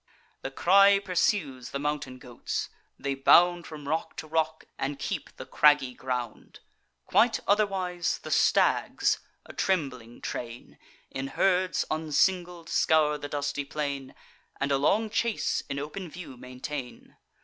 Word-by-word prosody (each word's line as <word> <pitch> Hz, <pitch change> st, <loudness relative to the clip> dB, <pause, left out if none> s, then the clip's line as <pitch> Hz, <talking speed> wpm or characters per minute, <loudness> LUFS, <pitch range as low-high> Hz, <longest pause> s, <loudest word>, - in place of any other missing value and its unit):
The -, -, -4 dB
cry 195 Hz, +7 st, +5 dB
pursues 180 Hz, -8 st, 0 dB
the -, -, -3 dB
mountain 145 Hz, -3 st, -3 dB
goats: 120 Hz, -1 st, -5 dB, 0.3 s
they 140 Hz, 0 st, -2 dB
bound 175 Hz, +5 st, +5 dB
From 150 Hz, -2 st, -9 dB
rock 160 Hz, +2 st, -2 dB
to -, -, -5 dB
rock, 160 Hz, 0 st, -1 dB
and 140 Hz, +1 st, -2 dB
keep 140 Hz, -, -4 dB
the -, -, -7 dB
craggy 145 Hz, -4 st, +4 dB
ground; 125 Hz, -3 st, -5 dB, 0.5 s
Quite 230 Hz, +1 st, +3 dB
otherwise 190 Hz, -4 st, +1 dB
the -, -, -6 dB
stags, -, -, +2 dB, 0.3 s
a -, -, -11 dB
trembling 130 Hz, -11 st, -2 dB
train, 120 Hz, 0 st, -7 dB, 0.3 s
In 135 Hz, 0 st, -4 dB
herds 185 Hz, +4 st, +1 dB
unsingled, 170 Hz, +2 st, 0 dB
scour 155 Hz, -3 st, +3 dB
the 145 Hz, -, -6 dB
dusty 145 Hz, 0 st, -2 dB
plain, 140 Hz, -2 st, -4 dB, 0.4 s
And 140 Hz, +1 st, -1 dB
a 135 Hz, -, +2 dB
long 215 Hz, +9 st, +2 dB
chase 235 Hz, 0 st, 0 dB
in 140 Hz, -, -3 dB
open 155 Hz, +6 st, -5 dB
view 165 Hz, -5 st, -9 dB
maintain. 125 Hz, +1 st, -8 dB
150 Hz, 135 wpm, -28 LUFS, 135-180 Hz, 0.5 s, cry